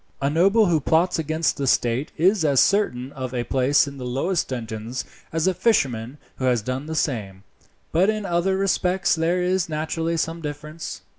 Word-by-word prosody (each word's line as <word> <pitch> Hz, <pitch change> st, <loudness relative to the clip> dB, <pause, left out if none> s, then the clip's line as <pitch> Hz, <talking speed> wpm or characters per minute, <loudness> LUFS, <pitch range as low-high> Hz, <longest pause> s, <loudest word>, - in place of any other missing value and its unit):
"A 140 Hz, +1 st, 0 dB
noble 195 Hz, +8 st, +4 dB
who 170 Hz, -4 st, +2 dB
plots 160 Hz, +5 st, +2 dB
against 160 Hz, +1 st, 0 dB
the 140 Hz, -, -2 dB
state 120 Hz, +4 st, +1 dB
is 185 Hz, +3 st, +3 dB
as 140 Hz, -4 st, +3 dB
certain 135 Hz, -11 st, +2 dB
of 130 Hz, -2 st, -6 dB
a 120 Hz, -, 0 dB
place 135 Hz, +4 st, +2 dB
in 140 Hz, -1 st, -8 dB
the -, -, -6 dB
lowest 135 Hz, +9 st, -1 dB
dungeons 115 Hz, 0 st, -5 dB, 0.3 s
as 160 Hz, 0 st, 0 dB
a 190 Hz, -, +3 dB
fisherman 135 Hz, -, 0 dB, 0.2 s
who 130 Hz, -, -2 dB
has 120 Hz, -4 st, +2 dB
done 130 Hz, +5 st, -4 dB
the 160 Hz, -, -4 dB
same; 105 Hz, -11 st, -2 dB, 0.5 s
but 180 Hz, +5 st, +3 dB
in 215 Hz, -1 st, -1 dB
other 180 Hz, +2 st, +1 dB
respects 190 Hz, -1 st, +1 dB
there 170 Hz, +2 st, +1 dB
is 180 Hz, -1 st, 0 dB
naturally 160 Hz, +2 st, -2 dB
some 165 Hz, +1 st, -2 dB
difference." 150 Hz, +1 st, -6 dB
155 Hz, 180 wpm, -23 LUFS, 130-175 Hz, 0.5 s, noble